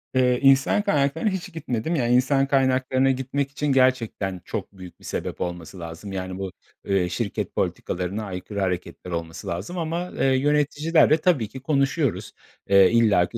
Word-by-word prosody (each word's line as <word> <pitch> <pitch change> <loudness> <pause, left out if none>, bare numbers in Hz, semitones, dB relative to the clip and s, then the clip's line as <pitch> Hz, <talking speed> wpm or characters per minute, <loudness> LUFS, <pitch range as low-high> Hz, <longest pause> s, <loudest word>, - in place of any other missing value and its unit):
Eee, 125 -1 +3
insan 135 +7 +4
kaynaklarına 160 -1 +1
hiç 190 -4 -5
gitmedim. 155 0 -2
Yani, 120 -5 +1
insan 135 +2 +3
kaynaklarına 130 -1 +2
gitmek 135 +2 -2
için 150 +2 -3
gerçekten 120 -8 +1
çok 100 -2 -6
büyük 90 -1 -11
bir - - -16
sebep - - -4
olması 90 +1 -5
lazım 85 +4 -8
yani 95 -1 -4
bu, 95 -1 -4 0.3
eee, 95 -3 +1
şirket 100 +3 -3
politikalarına 95 +4 -2
aykırı 95 +1 -6
hareketler 90 -1 -3
olması 85 -1 -5
lazım 95 - -4
ama, 170 +2 -3
eee, - - +2
yöneticilerle 150 +4 +3
tabii 155 -9 +1
ki 130 - -9
konuşuyoruz. 140 -1 0 0.4
Eee, 100 -1 +6
illaki 105 -7 +3
130 Hz, 155 wpm, -24 LUFS, 95-140 Hz, 0.4 s, Eee